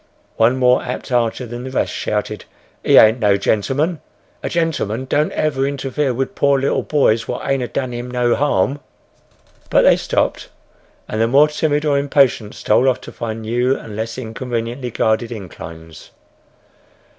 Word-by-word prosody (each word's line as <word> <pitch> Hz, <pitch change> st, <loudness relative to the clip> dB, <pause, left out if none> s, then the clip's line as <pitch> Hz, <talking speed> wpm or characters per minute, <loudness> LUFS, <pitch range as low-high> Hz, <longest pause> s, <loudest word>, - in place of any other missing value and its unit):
One 115 Hz, +3 st, +3 dB
more 125 Hz, 0 st, +4 dB
apt -, -, -6 dB
archer 120 Hz, 0 st, 0 dB
than 120 Hz, +1 st, -7 dB
the 130 Hz, -, -6 dB
rest, 130 Hz, -, -1 dB
shouted, 105 Hz, -1 st, -3 dB, 0.4 s
"He -, -, +5 dB
ain't 110 Hz, +3 st, +7 dB
no 105 Hz, -3 st, +3 dB
gentleman—a 135 Hz, -, -2 dB
gentleman 145 Hz, -, -1 dB
don't 150 Hz, +4 st, +1 dB
never 140 Hz, -3 st, 0 dB
interfere 140 Hz, 0 st, -2 dB
wid 130 Hz, +2 st, -3 dB
poor 140 Hz, -1 st, +2 dB
little 135 Hz, -, 0 dB
boys 115 Hz, -7 st, +1 dB
what 125 Hz, -, -4 dB
ain't 135 Hz, -1 st, +1 dB
a 125 Hz, -, -2 dB
done 130 Hz, 0 st, -3 dB
him 120 Hz, +1 st, -5 dB
no 125 Hz, -1 st, +1 dB
harm!" 145 Hz, 0 st, +1 dB, 0.9 s
But -, -, +4 dB
they -, -, +5 dB
stopped, -, -, -1 dB, 0.6 s
and 110 Hz, -, -2 dB
the 115 Hz, -, +3 dB
more 140 Hz, +5 st, +5 dB
timid 150 Hz, 0 st, 0 dB
or 145 Hz, -2 st, +2 dB
impatient 135 Hz, -6 st, +1 dB
stole 125 Hz, +5 st, +2 dB
off 130 Hz, -, 0 dB
to -, -, -10 dB
find 115 Hz, -1 st, -5 dB
new 120 Hz, +4 st, +1 dB
and 105 Hz, -, -9 dB
less 115 Hz, +2 st, -4 dB
inconveniently 120 Hz, +1 st, -4 dB
guarded 110 Hz, +1 st, 0 dB
inclines. 80 Hz, -6 st, -10 dB
125 Hz, 160 wpm, -19 LUFS, 110-135 Hz, 0.9 s, ain't